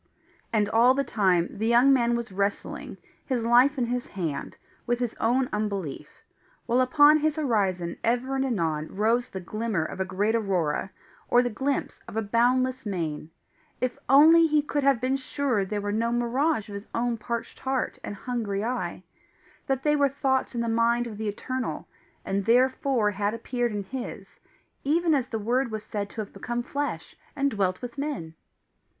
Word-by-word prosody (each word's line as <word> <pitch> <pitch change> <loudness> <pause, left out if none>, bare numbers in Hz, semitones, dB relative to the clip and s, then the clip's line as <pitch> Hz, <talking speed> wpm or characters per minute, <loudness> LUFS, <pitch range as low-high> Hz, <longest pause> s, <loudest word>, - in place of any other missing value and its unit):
And 210 -2 +2
all 235 +4 +5
the 275 - +1
time, 185 -8 +2
the 220 +2 -1
young 240 +4 +6
man 240 -2 +2
was 235 -2 -4
wrestling, 200 +1 -3 0.3
his 250 -4 -1
life 245 +5 +5
in 250 - +1
his 245 +1 -2
hand, 165 -8 -4 0.3
with 240 0 +1
his 245 -3 -1
own 250 +3 +2
unbelief; 200 -7 -4 0.4
while 245 +2 +2
upon 290 +4 +6
his 305 0 +1
horizon 195 - 0
ever 245 +3 0
and 265 - +1
anon 165 - -1
rose 230 +4 +1
the 190 - -6
glimmer 215 -2 -2
of - - -7
a - - +2
great 200 +4 0
aurora, 190 -7 0 0.4
or 245 +1 +5
the 245 - -1
glimpse 270 +5 -2
of 220 - -7
a 225 - +1
boundless 250 +4 +2
main 165 -7 -3 0.5
if 250 0 -2
only 320 +5 +7
he 305 -1 +2
could 290 0 -1
have 275 -3 +4
been 260 +2 0
sure 260 -5 -1
they 205 +2 -3
were 205 0 -2
no 230 +2 0
mirage 240 +2 0
of 205 - -9
his 200 +1 -7
own 235 0 0
parched 235 +1 -5
heart 265 -1 -2
and 205 - -5
hungry 210 -3 -3
eye 220 -7 -3 0.6
that 270 -1 -1
they 300 0 +3
were 285 -1 +3
thoughts 265 -1 0
in 235 - 0
the 235 - -1
mind 230 +1 +2
of 215 -3 -7
the 220 - -2
Eternal, 255 +5 -4 0.4
and 195 0 -1
THEREFORE 250 -1 +3
had 205 +2 -1
appeared 240 +1 -2
in 205 -1 -3
his, 250 +5 -7 0.4
even 325 +3 +2
as 265 -4 +1
the 225 - -3
Word 240 +4 0
was 215 -1 -5
said 205 -1 -4
to 220 - -5
have 205 - -9
become 240 0 -3
flesh 285 +3 -4 0.2
and 280 0 +1
dwelt 190 -1 -1
with 245 +3 -6
men! 275 - -4
235 Hz, 180 wpm, -26 LUFS, 205-260 Hz, 0.6 s, only